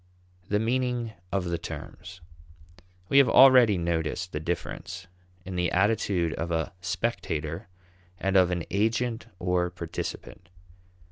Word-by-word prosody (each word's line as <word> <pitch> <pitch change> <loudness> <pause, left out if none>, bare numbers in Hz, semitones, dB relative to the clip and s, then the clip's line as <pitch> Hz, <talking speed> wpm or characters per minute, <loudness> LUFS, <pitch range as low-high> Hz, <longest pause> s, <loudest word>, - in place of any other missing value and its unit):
The 105 - +2
Meaning 120 0 -1 0.2
of 95 0 0
the 85 -1 -2
Terms. 85 +3 -9 0.9
We 140 - +5
have 135 -4 +5
already 125 -7 +7
noticed 85 +1 -2
the 75 - -3
difference 85 +3 -5 0.4
in 95 0 -6
the 90 0 0
attitude 95 -4 +1
of 85 +3 -4
a 80 -1 -1
spectator 85 -4 -3 0.5
and 95 +1 -1
of 90 -2 +6
an 90 -2 -1
agent 115 +3 0
or 90 -1 0
participant. 85 0 -7
90 Hz, 125 wpm, -27 LUFS, 85-110 Hz, 0.9 s, already